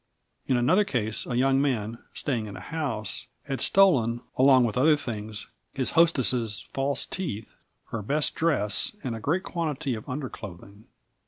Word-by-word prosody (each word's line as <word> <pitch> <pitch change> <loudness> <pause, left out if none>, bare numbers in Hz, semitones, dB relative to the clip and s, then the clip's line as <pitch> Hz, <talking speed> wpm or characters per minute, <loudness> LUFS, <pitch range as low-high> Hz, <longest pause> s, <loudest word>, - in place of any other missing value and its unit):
In 130 - +2
another 160 +12 +4
case, 110 - -1
a 120 - -2
young 135 +1 +3
man, 115 -5 -1 0.2
staying 120 -6 -2
in 100 - -8
a - - -7
house, 125 -11 -4 0.2
had 135 -4 -4
stolen, 120 -12 +4
along 130 -1 +6
with 115 -3 -1
other 150 +4 +5
things, 110 -6 -5 0.3
his 130 -2 -1
hostess's 130 - +3
false 135 0 0
teeth, 115 - -5 0.4
her 115 - -3
best 145 +8 +1
dress 165 - 0
and 125 -4 -3
a - - -6
great 170 - 0
quantity 150 -6 -2
of 110 +3 -7
underclothing. 105 - -7
130 Hz, 155 wpm, -27 LUFS, 110-150 Hz, 0.4 s, along